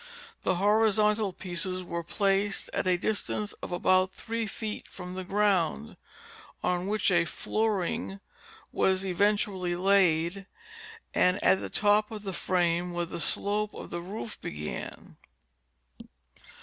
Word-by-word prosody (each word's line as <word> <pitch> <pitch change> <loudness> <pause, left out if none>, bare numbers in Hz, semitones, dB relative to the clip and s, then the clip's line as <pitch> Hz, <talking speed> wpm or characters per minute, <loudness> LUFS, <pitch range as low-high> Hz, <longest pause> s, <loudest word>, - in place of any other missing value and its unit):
The - - +1
horizontal 210 +1 +3
pieces 185 0 -3
were 170 -1 -3
placed 195 +3 0
at - - 0
a 180 -1 +3
distance 210 +1 -2
of - - -6
about 185 +1 +2
three 230 0 -3
feet 215 +1 -5
from 180 -1 -8
the 185 0 -4
ground, 185 - +1 0.7
on 180 +1 0
which 210 -1 +1
a 175 -2 +4
flooring 200 0 -1 0.5
was 190 0 +1
eventually 190 -1 +1
laid, 185 0 +2 0.7
and 180 0 +3
at 95 +2 +5
the 100 - -5
top 210 - +3
of 215 -2 -7
the 195 -2 -4
frame 175 -1 0
where 175 0 -1
the 170 - -6
slope 205 +5 0
of - - -8
the 170 - -3
roof 210 +5 -7
began. 75 +1 -6
190 Hz, 130 wpm, -29 LUFS, 175-210 Hz, 0.7 s, at